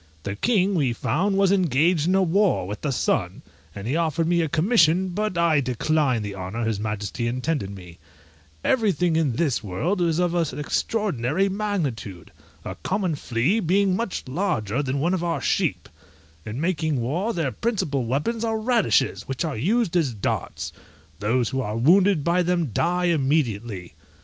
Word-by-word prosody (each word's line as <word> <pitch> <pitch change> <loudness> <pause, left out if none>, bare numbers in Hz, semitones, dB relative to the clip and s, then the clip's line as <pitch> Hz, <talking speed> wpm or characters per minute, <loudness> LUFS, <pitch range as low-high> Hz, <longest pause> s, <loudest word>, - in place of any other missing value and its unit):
The 100 0 -4
king, 200 - +2
we 140 -9 +1
found, 190 - 0
was 195 -1 +4
engaged 165 -2 +2
in 185 - +3
a 190 - +4
war 185 - +2
with 105 +1 -6
the 150 - -1
sun, 135 - -1 0.3
and 100 0 -7
he 135 - 0
offered 165 0 0
me 170 0 +2
a 160 - -1
commission, 175 - +3
but 210 +1 -2
I 165 -4 +3
declined 130 -2 0
the 100 - -5
honour 100 +5 -4
his 110 -2 -1
majesty 105 +2 -3
intended 125 -2 -2
me. 90 -4 -11 0.6
Everything 190 -8 +2
in 155 -6 +1
this 140 -2 0
world 155 - -1
is 165 -2 +1
of 175 -1 +1 0.2
extraordinary 180 - 0
magnitude! 150 - -3 0.3
a - - -4
common 190 -2 -1
flea 140 - 0
being 195 0 +2
much 230 -1 -3
larger 130 - -1
than 135 0 -2
one 170 +6 +1
of 180 -2 -1
our 170 -1 -1
sheep: - - 0 0.6
in 110 +4 -4
making 160 -4 0
war, 165 - -1
their 165 - -1
principal 155 - -1
weapons 150 - -1
are 225 -1 0
radishes, 220 - +1
which 135 +5 -2
are 155 - -3
used 195 - 0
as 145 -9 +1
darts: 100 - -3 0.5
those 115 +3 +1
who 130 - -1
are 105 -2 -3
wounded 180 +5 +4
by 170 +3 +2
them 175 -6 0
die 180 - +1
immediately. 120 - 0
160 Hz, 165 wpm, -24 LUFS, 120-185 Hz, 0.6 s, was